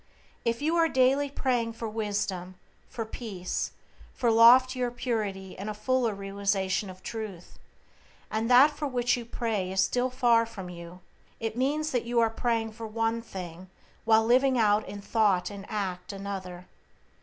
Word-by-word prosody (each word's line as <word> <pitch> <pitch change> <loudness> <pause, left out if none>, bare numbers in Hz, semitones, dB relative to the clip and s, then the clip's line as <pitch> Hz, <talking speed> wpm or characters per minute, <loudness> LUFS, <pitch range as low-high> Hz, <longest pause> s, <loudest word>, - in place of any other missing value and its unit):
If 235 +4 -1
you 320 +3 +1
are 330 -1 +4
daily 270 +2 +3
praying 245 -4 -1
for 225 0 -5
wisdom, 200 -4 -3 0.3
for 225 - -4
peace, 205 -5 -4 0.4
for 240 -2 +2
loftier 250 +2 +6
purity 210 -6 -3
and 200 +3 -6
a 210 - -4
fuller 245 -1 0
realization 195 0 -1
of 185 0 -12
Truth, 215 -6 -7 0.7
and 220 +2 -1
that 260 +4 +7
for 295 0 -4
which 245 -2 +1
you 240 -2 -6
pray 220 -6 -2
is 190 - -2
still 250 +5 0
far 235 -2 +3
from 190 -5 -8
you, 170 +1 -10 0.4
it 225 -1 -3
means 295 +5 0
that 245 -2 -1
you 240 0 +1
are 225 -1 +3
praying 225 -1 -1
for 225 +1 -7
one 225 +1 -1
thing 185 -4 -8 0.3
while 220 -1 +4
living 255 +2 +4
out 210 -2 +3
in 205 - -7
thought 205 -3 +1
and 200 -1 -9
act 190 -4 -3
another. 190 -3 -6
225 Hz, 160 wpm, -28 LUFS, 195-245 Hz, 0.7 s, that